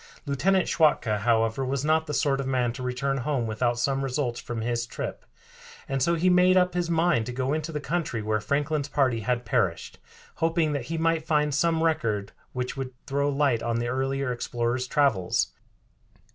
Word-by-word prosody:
Lieutenant 185 Hz, +7 st, +2 dB
Schwatka, 150 Hz, -10 st, +2 dB
however, 115 Hz, +3 st, +1 dB
was 135 Hz, +2 st, -2 dB
not 160 Hz, +1 st, +2 dB
the 150 Hz, -, -3 dB
sort 140 Hz, -2 st, +1 dB
of 135 Hz, -, -4 dB
man 125 Hz, -3 st, +1 dB
to 130 Hz, -, -8 dB
return 125 Hz, +2 st, -1 dB
home 130 Hz, -1 st, -1 dB
without 120 Hz, +2 st, 0 dB
some 135 Hz, +3 st, 0 dB
results 125 Hz, -2 st, -2 dB
from 120 Hz, -2 st, -5 dB
his 120 Hz, +1 st, -1 dB
trip, -, -, -6 dB, 0.6 s
and 135 Hz, -1 st, -2 dB
so 170 Hz, +6 st, +3 dB
he 170 Hz, +3 st, +1 dB
made 180 Hz, +1 st, +5 dB
up 180 Hz, -1 st, +3 dB
his 175 Hz, -1 st, -1 dB
mind 160 Hz, -9 st, +2 dB
to -, -, -3 dB
go 130 Hz, +2 st, -1 dB
into 155 Hz, +1 st, -2 dB
the 150 Hz, -, -3 dB
country 150 Hz, -5 st, -2 dB
where 110 Hz, 0 st, 0 dB
Franklin's 145 Hz, +3 st, -1 dB
party 135 Hz, -5 st, +1 dB
had 120 Hz, +2 st, -1 dB
perished, 115 Hz, -, -1 dB, 0.4 s
hoping 165 Hz, -1 st, +1 dB
that 140 Hz, -5 st, -3 dB
he 165 Hz, +4 st, -3 dB
might 165 Hz, -1 st, 0 dB
find 150 Hz, -2 st, +2 dB
some 165 Hz, +2 st, +2 dB
record 110 Hz, -11 st, 0 dB, 0.2 s
which 125 Hz, 0 st, -3 dB
would 135 Hz, -1 st, -5 dB
throw 140 Hz, 0 st, 0 dB
light 140 Hz, -5 st, +1 dB
on 115 Hz, 0 st, -1 dB
the 120 Hz, 0 st, -1 dB
earlier 135 Hz, +1 st, -1 dB
explorer's 120 Hz, +1 st, -2 dB
travels. 125 Hz, -, +1 dB
135 Hz, 185 wpm, -26 LUFS, 120-155 Hz, 0.6 s, made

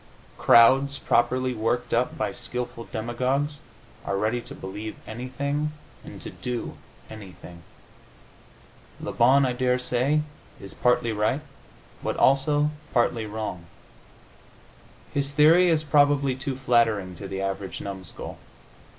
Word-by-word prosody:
Crowds, 135 Hz, +4 st, +6 dB
properly 125 Hz, +2 st, +1 dB
worked 115 Hz, +2 st, -1 dB
up 125 Hz, +2 st, +1 dB
by 105 Hz, -2 st, -1 dB
skilful 120 Hz, +1 st, -5 dB
demagogues, 130 Hz, +6 st, -2 dB, 0.4 s
are 100 Hz, -, -2 dB
ready 110 Hz, +4 st, 0 dB
to -, -, -9 dB
believe 105 Hz, +3 st, -7 dB
anything, 140 Hz, +6 st, -3 dB, 0.3 s
and -, -, -10 dB
to -, -, -6 dB
do 125 Hz, -1 st, -4 dB, 0.3 s
anything. 90 Hz, -5 st, -11 dB, 1.4 s
Le -, -, -5 dB
Bon, 135 Hz, +4 st, +5 dB
I 125 Hz, -, 0 dB
daresay, 125 Hz, +3 st, +1 dB, 0.4 s
is 100 Hz, -, -10 dB
partly 120 Hz, -1 st, +2 dB
right, 110 Hz, +7 st, 0 dB, 0.6 s
but -, -, -2 dB
also 145 Hz, +2 st, +3 dB, 0.2 s
partly 115 Hz, -2 st, +1 dB
wrong. 105 Hz, -5 st, -5 dB, 1.5 s
His 140 Hz, 0 st, -1 dB
theory 165 Hz, +5 st, +6 dB
is 160 Hz, -2 st, +2 dB
probably 145 Hz, -2 st, +3 dB
too 135 Hz, 0 st, -3 dB
flattering 115 Hz, -7 st, +1 dB
to 100 Hz, -, -7 dB
the 95 Hz, 0 st, -4 dB
average 95 Hz, -1 st, -4 dB
numskull. 95 Hz, -4 st, -8 dB
125 Hz, 115 wpm, -25 LUFS, 110-140 Hz, 1.5 s, Crowds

